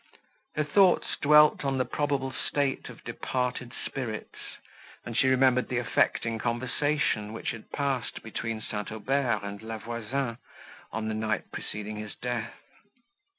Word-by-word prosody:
Her 150 - +2
thoughts 180 +5 +4
dwelt 150 +1 +7
on 135 -1 +1
the 130 - +2
probable 140 0 0
state 140 -2 -1
of - - -12
departed 125 -1 -2
spirits, 115 -5 -5 0.5
and 120 - -5
she 130 - +4
remembered 130 -1 +4
the 125 - 0
affecting 115 -1 +1
conversation, 125 -1 0
which 115 - -2
had 115 -2 -10
passed 135 -4 -1
between 110 0 -3
St. 105 -1 -4
Aubert 115 0 +1
and 100 0 -5
La 110 0 -5
Voisin, 115 +2 -3 0.5
on 110 0 -2
the 110 - -1
night 110 -1 -1
preceding 105 0 -5
his 105 0 -6
death. 120 -2 -3
120 Hz, 140 wpm, -29 LUFS, 110-135 Hz, 0.5 s, dwelt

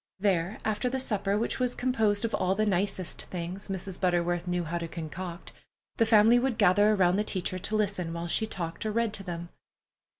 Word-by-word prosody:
There, 190 -1 +1
after 215 +3 0
the 265 +1 -2
supper, 205 -5 0
which 230 - -1
was 250 -1 0
composed 225 -4 +1
of 230 - -3
all 185 +1 +1
the 215 +1 +1
nicest 190 -2 -1
things 180 +3 -6
Mrs. 190 -1 -4
Butterworth 175 -1 +1
knew 180 0 0
how 170 +2 -3
to 170 - -4
concoct, 170 +2 -7 0.4
the 230 - +3
family 225 +2 +6
would 250 -2 0
gather 205 0 +5
around 185 -1 +3
the 210 - +2
teacher 185 -2 -2
to 215 +4 -3
listen 200 -5 0
while 170 0 -4
she 220 +5 +1
talked 170 -4 -5
or 215 - -1
read 230 -1 0
to 200 - -2
them. 170 -2 -6
195 Hz, 200 wpm, -28 LUFS, 175-215 Hz, 0.4 s, family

